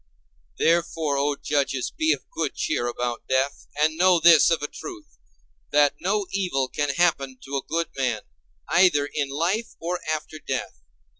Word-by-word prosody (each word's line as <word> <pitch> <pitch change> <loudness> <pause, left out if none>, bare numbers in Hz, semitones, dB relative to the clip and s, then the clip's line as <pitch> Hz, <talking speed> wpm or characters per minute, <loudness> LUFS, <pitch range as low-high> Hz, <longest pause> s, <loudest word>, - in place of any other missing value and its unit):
Wherefore, 165 -3 +1
O 145 +1 +1
judges, 140 -3 -1
be 315 0 +2
of - - -2
good - - -2
cheer 120 -6 -1
about 120 0 -3
death, 135 +2 0
and 155 +1 +2
know 180 0 +5
this 165 -1 +7
of 165 -3 +1
a - - -1
truth—that 80 - -3
no 200 +3 0
evil 175 -9 0
can 145 0 -1
happen 140 -7 +1
to 140 +1 -3
a - - -2
good 165 +1 -1
man, 125 -5 -1 0.4
either 170 -5 +4
in 145 0 -3
life 175 +11 -1
or 175 +2 -2
after 155 0 -4
death. 105 - -4
150 Hz, 155 wpm, -24 LUFS, 135-170 Hz, 0.4 s, this